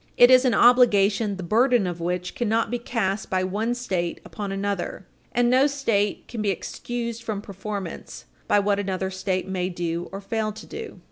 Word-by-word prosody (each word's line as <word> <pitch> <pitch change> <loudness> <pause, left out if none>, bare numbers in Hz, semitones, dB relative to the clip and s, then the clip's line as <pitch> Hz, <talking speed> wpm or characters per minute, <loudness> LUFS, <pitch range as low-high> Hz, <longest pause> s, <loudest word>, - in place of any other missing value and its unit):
It 245 +1 +8
is 255 +1 +7
an 245 -3 +3
obligation 210 -4 +4
the 190 - -6
burden 235 +4 +3
of 175 -1 -3
which 180 +1 -2
cannot 225 -1 0
be 245 - -1
cast 215 -5 -2
by 185 0 +1
one 215 +6 -1
State 185 -8 -2
upon 205 -2 -5
another, 195 -1 -3 0.3
and 240 0 +2
no 260 +3 +5
State 230 -8 0
can 230 -3 -5
be 210 - +1
excused 235 +4 -4
from 220 -3 -3
performance 200 -2 -7 0.2
by 205 - +4
what 200 0 +1
another 190 -1 -2
State 190 0 -2
may 185 -1 -2
do 175 -1 -3
or 195 - -5
fail 215 +2 -2
to 215 - -10
do. 450 0 -8
205 Hz, 185 wpm, -24 LUFS, 190-235 Hz, 0.3 s, It